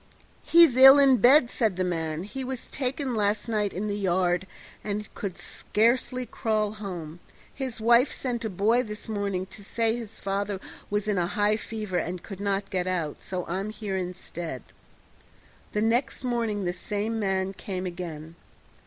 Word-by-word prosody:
"He's 330 Hz, -7 st, +6 dB
ill 270 Hz, +1 st, +10 dB
in 275 Hz, -2 st, +6 dB
bed," 245 Hz, +3 st, +6 dB
said 220 Hz, -6 st, +1 dB
the 185 Hz, -, 0 dB
man; 165 Hz, -2 st, -2 dB
"he 235 Hz, +7 st, -6 dB
was 255 Hz, -1 st, -5 dB
taken 265 Hz, 0 st, -2 dB
last 210 Hz, +1 st, 0 dB
night 210 Hz, -3 st, 0 dB
in 200 Hz, +4 st, -3 dB
the 205 Hz, -, -1 dB
yard, 185 Hz, -2 st, +1 dB, 0.4 s
and 210 Hz, 0 st, -3 dB
could 195 Hz, -4 st, -5 dB
scarcely 250 Hz, +3 st, 0 dB
crawl 215 Hz, -3 st, -1 dB
home. 175 Hz, -6 st, -7 dB, 0.3 s
His 260 Hz, -4 st, -5 dB
wife 235 Hz, +4 st, +5 dB
sent 245 Hz, -3 st, -3 dB
a 220 Hz, -, -1 dB
boy 215 Hz, +6 st, +2 dB
this 210 Hz, -3 st, -8 dB
morning 200 Hz, -4 st, -2 dB
to 205 Hz, -, -11 dB
say 225 Hz, +2 st, 0 dB
his 225 Hz, -3 st, -8 dB
father 200 Hz, 0 st, -2 dB, 0.3 s
was 205 Hz, 0 st, -1 dB
in 205 Hz, -3 st, +1 dB
a 170 Hz, -, +1 dB
high 205 Hz, +2 st, +2 dB
fever 215 Hz, -4 st, -3 dB
and 175 Hz, +1 st, -4 dB
could 195 Hz, -3 st, -8 dB
not 200 Hz, 0 st, -1 dB
get 185 Hz, -2 st, -1 dB
out, 170 Hz, -5 st, -2 dB
so 180 Hz, -2 st, -4 dB
I'm 190 Hz, +4 st, -3 dB
here 215 Hz, -2 st, -4 dB
instead." 175 Hz, -6 st, -5 dB, 1.1 s
The 210 Hz, -, +1 dB
next 240 Hz, +4 st, 0 dB
morning 230 Hz, -5 st, -1 dB
the 175 Hz, -1 st, -1 dB
same 210 Hz, +4 st, -3 dB
man 190 Hz, -1 st, 0 dB
came 190 Hz, -1 st, -5 dB
again. 165 Hz, -3 st, -6 dB
205 Hz, 170 wpm, -27 LUFS, 185-230 Hz, 1.1 s, ill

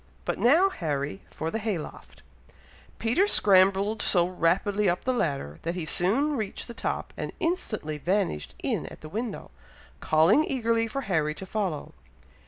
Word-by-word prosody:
But -, -, -2 dB
now, 335 Hz, +11 st, +5 dB
Harry, 140 Hz, -, -3 dB
for 160 Hz, +1 st, -4 dB
the 225 Hz, -, -2 dB
hay 215 Hz, -4 st, -1 dB
loft." 155 Hz, -, -10 dB, 0.7 s
Peter 290 Hz, -, +2 dB
scrambled 195 Hz, -, +4 dB
so 175 Hz, -2 st, +2 dB
rapidly 185 Hz, +3 st, +1 dB
up 175 Hz, -, -1 dB
the 255 Hz, -, +1 dB
ladder, 140 Hz, -, -2 dB
that 170 Hz, +2 st, -3 dB
he 175 Hz, -3 st, -3 dB
soon 230 Hz, -, +1 dB
reached 215 Hz, -6 st, -4 dB
the 235 Hz, -, -7 dB
top, -, -, -3 dB
and -, -, -4 dB
instantly 225 Hz, -, -2 dB
vanished 180 Hz, -, -1 dB
in -, -, -1 dB
at -, -, -11 dB
the 155 Hz, -, -9 dB
window, 225 Hz, +5 st, -5 dB, 0.5 s
calling 165 Hz, -, +4 dB
eagerly 230 Hz, -5 st, 0 dB
for 275 Hz, +5 st, -3 dB
Harry 155 Hz, -, 0 dB
to 190 Hz, -, -6 dB
follow. 190 Hz, -7 st, -3 dB
195 Hz, 160 wpm, -27 LUFS, 165-230 Hz, 0.7 s, now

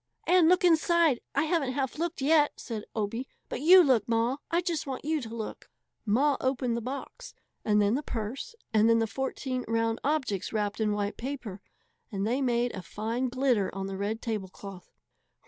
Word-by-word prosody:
"And 355 Hz, -3 st, +5 dB
look 365 Hz, +1 st, +4 dB
inside! 335 Hz, -4 st, +4 dB
I 280 Hz, -, +3 dB
haven't 315 Hz, -5 st, 0 dB
half 270 Hz, +2 st, -2 dB
looked 340 Hz, -4 st, -2 dB
yet," 295 Hz, 0 st, +4 dB
said 220 Hz, -3 st, -5 dB
Obie, 225 Hz, +4 st, -2 dB, 0.2 s
"but -, -, -4 dB
you 360 Hz, +4 st, +8 dB
look, 245 Hz, -, +2 dB
Ma! 230 Hz, +3 st, +1 dB
I 340 Hz, +1 st, +2 dB
just 340 Hz, -5 st, -2 dB
want 265 Hz, +1 st, -5 dB
you 310 Hz, -1 st, 0 dB
to 225 Hz, -, -7 dB
look!" 220 Hz, -2 st, -7 dB, 0.4 s
Ma 275 Hz, +7 st, +3 dB
opened 255 Hz, -2 st, 0 dB
the 235 Hz, -, -2 dB
box, 260 Hz, +4 st, -7 dB, 0.3 s
and 210 Hz, -1 st, +3 dB
then 205 Hz, +1 st, +3 dB
the 275 Hz, -, 0 dB
purse, 255 Hz, -, -5 dB, 0.2 s
and 220 Hz, +1 st, +5 dB
then 230 Hz, -, +5 dB
the 225 Hz, -, +2 dB
fourteen 260 Hz, +2 st, -3 dB
round 230 Hz, 0 st, 0 dB
objects 260 Hz, -10 st, -1 dB
wrapped 210 Hz, -1 st, -2 dB
in 210 Hz, -1 st, +2 dB
white 205 Hz, 0 st, -2 dB
paper. 240 Hz, -7 st, -6 dB, 0.5 s
And 195 Hz, -1 st, -2 dB
they 250 Hz, +5 st, 0 dB
made 245 Hz, -1 st, +1 dB
a 190 Hz, -, -5 dB
fine 225 Hz, +8 st, -3 dB
glitter 250 Hz, -6 st, +1 dB
on 195 Hz, 0 st, -3 dB
the 195 Hz, 0 st, -5 dB
red 205 Hz, +3 st, -3 dB
tablecloth. 195 Hz, -4 st, -6 dB
245 Hz, 185 wpm, -28 LUFS, 215-285 Hz, 0.5 s, you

